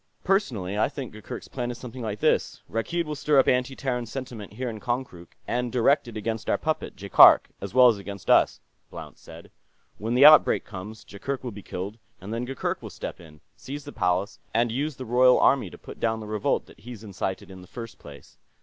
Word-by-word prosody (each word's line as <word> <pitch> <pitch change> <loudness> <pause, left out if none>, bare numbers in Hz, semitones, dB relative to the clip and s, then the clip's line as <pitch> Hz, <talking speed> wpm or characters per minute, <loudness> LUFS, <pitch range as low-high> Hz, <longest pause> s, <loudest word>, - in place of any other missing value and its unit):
"Personally, 110 - 0
I - - +2
think 135 -6 -7
Gurgurk's 105 0 -8
plan 120 -2 -4
is 120 - -5
something 125 +1 -9
like 105 -2 -4
this: - - +1
Rakkeed 170 +10 -2
will 150 - -4
stir 150 0 +1
up 135 - +5
anti 125 +1 +1
Terran 125 -3 -3
sentiment 115 -5 -7
here 125 +4 -4
in 110 -2 -5
Konkrook, 120 -8 -5
and 125 0 -1
direct 130 +2 +3
it 115 -2 -7
against 110 +1 -3
our - - +3
puppet, - - -3
Jaikark, - - +6
as - - -7
well 125 -1 +8
as 115 -4 +3
against 100 -2 -9
us," - - +4 0.3
Blount - - -10
said. - - -13 0.5
"When 115 +3 -2
the 135 +3 +7
outbreak 155 +1 +7
comes, 105 +2 -9
Jaikark 130 +7 -5
will 125 - -4
be 105 -1 -10
killed, 100 +5 -6 0.2
and 100 +3 -7
then 120 +2 -2
Gurgurk 135 0 -3
will - - -8
step - - -7
in, 75 -3 -15
seize 145 +2 -8
the 145 - -8
Palace, 95 -2 -1 0.2
and 115 0 +2
use 145 +4 -2
the 130 - -7
Royal 125 +2 +5
army 130 -9 +3
to - - -12
put - - -12
down 115 -1 0
the 110 - -7
revolt 105 -1 -1
that - - -18
he's 115 0 -10
incited 95 -2 -5
in 95 -1 -11
the 90 - -14
first 115 +2 -9
place. 70 -2 -14
115 Hz, 215 wpm, -26 LUFS, 105-130 Hz, 0.5 s, well